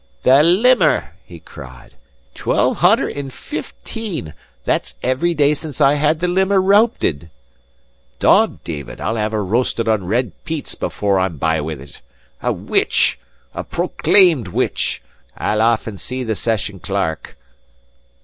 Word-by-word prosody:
"The 135 +3 +6
limmer!" 175 - +3
he 85 -2 -13
cried. 65 -6 -13 0.4
"Twelve - - 0
hunner - - +4
and 140 -2 -6
fifteen 150 - -6 0.3
that's - - -1
every 165 +7 0
day 145 -1 +3
since 150 -1 -7
I 140 -1 +5
had 150 +2 +2
the 175 - -1
limmer 190 +2 +2
rowpit!* 190 - +2 0.9
Dod, - - +3
David, 75 -5 -7
I'll 115 - -2
have 105 0 -1
her 105 -2 -1
roasted 115 +2 0
on 105 -5 0
red 120 +5 0
peats 160 -3 -5
before 100 -2 -1
I'm 95 -4 -1
by 80 +2 0
with 75 -1 -5
it! 70 0 -14 0.4
A - - 0
witch - - +1 0.3
a - - -4
proclaimed 170 - +2
witch! 90 - -2 0.3
I'll 105 +1 0
aff 115 0 +2
and 105 -4 -7
see 130 0 -4
the 110 -2 -1
session 105 -2 -2
clerk." 95 -6 -3
115 Hz, 140 wpm, -19 LUFS, 95-155 Hz, 0.9 s, The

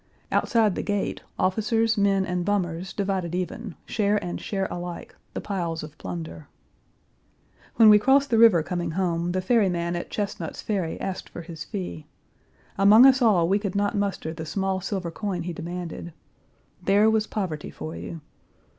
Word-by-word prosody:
Outside 220 -5 +2
the - - -3
gate 205 -1 -2 0.2
officers, 225 +3 +1
men, 200 -2 +2
and 180 -1 -2
bummers 185 -2 -1
divided 190 -4 -2
even, 185 +2 -4
share 210 -1 +1
and 175 - -4
share 195 -2 -2
alike, 175 0 -6 0.2
the - - -3
piles 170 -5 -3
of 150 -1 -9
plunder. 85 -3 -7 1.3
When 225 -1 +7
we 210 0 +9
crossed 270 +4 +3
the 225 - +4
river 215 -8 +7
coming 175 0 -3
home, 175 -2 0
the 185 +1 -1
ferry 210 0 +3
man 170 0 -1
at 175 - -4
Chesnut's 200 -5 -4
Ferry 190 -6 -2
asked 190 -1 -4
for 170 - -8
his 165 -1 -8
fee. 85 -4 -6 0.7
Among 210 +5 +8
us 265 -1 +6
all 195 -8 +4
we 195 +3 +2
could 200 -2 -4
not 205 +2 +1
muster 200 -5 -2
the 160 -1 -6
small 190 +3 -1
silver 185 -3 -3
coin 185 -2 -3
he 175 0 -4
demanded. 170 0 -6 0.7
There 205 +2 +4
was 220 -1 +2
poverty 175 -8 -3
for 160 - -7
you. 165 - -7
190 Hz, 165 wpm, -25 LUFS, 170-205 Hz, 1.3 s, we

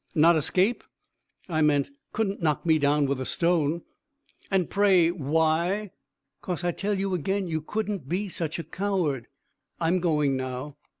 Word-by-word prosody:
"Not 165 +2 +6
escape?" 185 - +1 0.6
"I 160 -3 0
meant 150 - +2 0.2
couldn't 200 -4 -1
knock 155 -1 0
me 160 -2 +4
down 145 0 +3
with 140 -1 -1
a - - -3
stone." 170 -2 +1 0.7
"And 190 -3 +1
pray 190 -5 +4
why?" 165 +5 0 0.5
"'Cause 180 -1 -3
I 175 - +1
tell 200 +4 -1
you 195 -1 -1
agen 190 +3 -1
you 160 -2 -2
couldn't 200 -4 -3
be 195 +4 -1
such 170 -3 -3
a 170 - -4
coward. 180 - -1 0.5
I'm 170 +2 +2
going 150 -5 +1
now." 130 +2 -5
170 Hz, 155 wpm, -26 LUFS, 150-190 Hz, 0.7 s, Not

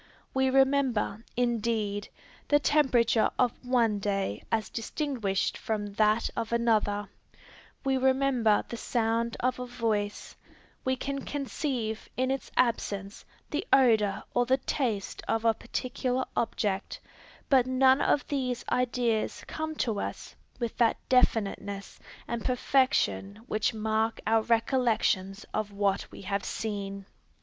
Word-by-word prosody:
We 265 0 +2
remember, 265 -5 +2
indeed, 225 -4 0 0.4
the 290 - +5
temperature 255 -7 +3
of 250 -2 +3
one 235 -4 +2
day 195 - -1
as 220 -3 +1
distinguished 230 -5 -2
from 205 -2 -3
that 215 +2 +3
of 230 -1 -3
another; 215 -3 +1 0.8
we 270 -1 +2
remember 260 -4 +3
the 235 - -6
sound 230 0 0
of 255 0 0
a 250 - -4
voice; 220 -4 -2 0.5
we 260 0 +1
can 275 +2 -4
conceive, 260 -6 -3
in 260 +1 +1
its 270 - -3
absence, 205 -5 0 0.3
the 300 - -1
odor 220 -7 +4
or 245 0 +2
the 260 +1 +4
taste 240 -6 -2
of 225 0 0
a 225 - +5
particular 250 +2 -2
object; 205 -4 -1 0.5
but 260 -3 +4
none 260 +1 +4
of 290 - +2
these 255 -4 -2
ideas 240 -3 0
come 315 0 -4
to 225 -8 -1
us - - -5 0.2
with 235 -2 -3
that 235 -2 +3
definiteness 205 -5 +1 0.3
and 235 -1 -3
perfection 250 - +1
which 215 -4 0
mark 220 +1 0
our 225 +1 +3
recollections 225 -4 +1
of 215 -1 -2
what 200 -1 0
we - - -10
have 200 0 -2
seen. 200 -2 -4
230 Hz, 125 wpm, -29 LUFS, 210-255 Hz, 0.8 s, the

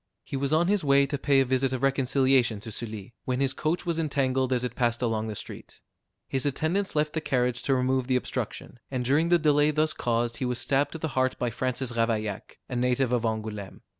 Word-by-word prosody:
He - - -6
was 135 +1 -1
on 160 +2 +3
his 205 -2 +2
way 140 -1 +5
to 140 +1 -3
pay 140 -1 +4
a - - +2
visit 130 +1 +1
of 130 0 -3
reconciliation 130 -4 +2
to 110 - -8
Sully, 110 -1 -7
when 125 0 -1
his 135 -1 +1
coach 160 +3 -1
was 170 -1 -1
entangled 135 -4 0
as 125 -1 +1
it 125 -1 -2
passed 120 -1 0
along 110 -2 0
the 110 - -4
street. - - -8 0.5
His 135 -1 -1
attendants 160 +7 -1
left 150 0 +1
the 160 - -1
carriage 125 -4 0
to 135 - +1
remove 130 0 +1
the 130 - +2
obstruction, 125 -1 -4
and 125 -2 -2
during 150 +6 +2
the 175 - +6
delay 150 -2 +3
thus 155 +1 +1
caused 120 0 -1
he 130 - -2
was 125 -1 -1
stabbed 140 +3 +1
to - - -4
the 160 0 -3
heart 130 -1 0
by 120 -1 -1
Francis 130 +1 -2
Ravaillac, 110 -3 -2
a 125 - -5
native 125 +1 +1
of 125 -2 +2
Angoulême. 110 -3 -4
130 Hz, 225 wpm, -27 LUFS, 120-145 Hz, 0.5 s, the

